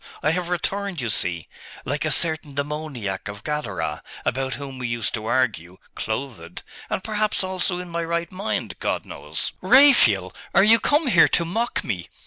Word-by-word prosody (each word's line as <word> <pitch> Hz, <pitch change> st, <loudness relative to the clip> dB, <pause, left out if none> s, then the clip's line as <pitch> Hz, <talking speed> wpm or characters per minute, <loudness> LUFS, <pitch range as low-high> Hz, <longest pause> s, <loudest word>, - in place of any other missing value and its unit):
I 155 Hz, -, +3 dB
have 175 Hz, +1 st, -2 dB
returned, 195 Hz, +1 st, -2 dB
you 120 Hz, -3 st, -2 dB
see, 85 Hz, -4 st, -2 dB, 0.4 s
like -, -, -1 dB
a -, -, +1 dB
certain 155 Hz, -3 st, -1 dB
demoniac 140 Hz, -9 st, -3 dB
of 100 Hz, 0 st, -7 dB
Gadara, 150 Hz, 0 st, -3 dB, 0.2 s
about 130 Hz, 0 st, -1 dB
whom 135 Hz, 0 st, -7 dB
we 125 Hz, -, -2 dB
used 115 Hz, -1 st, -2 dB
to 110 Hz, -1 st, -4 dB
argue, 95 Hz, -9 st, 0 dB, 0.2 s
clothed 110 Hz, -7 st, -5 dB, 0.3 s
and 185 Hz, -, -2 dB
perhaps 215 Hz, -2 st, 0 dB
also 185 Hz, -1 st, -1 dB
in 180 Hz, 0 st, -6 dB
my 170 Hz, 0 st, -2 dB
right 170 Hz, 0 st, -2 dB
mind.... 195 Hz, +3 st, -3 dB
God -, -, -1 dB
knows!' -, -, -4 dB
'Raphael! 180 Hz, -, +6 dB, 0.2 s
are 190 Hz, -, +7 dB
you 225 Hz, +2 st, +7 dB
come 295 Hz, +6 st, +2 dB
here 210 Hz, -10 st, +6 dB
to 170 Hz, -, +1 dB
mock 225 Hz, +8 st, -1 dB
me? 90 Hz, -7 st, -4 dB
150 Hz, 170 wpm, -24 LUFS, 115-185 Hz, 0.4 s, are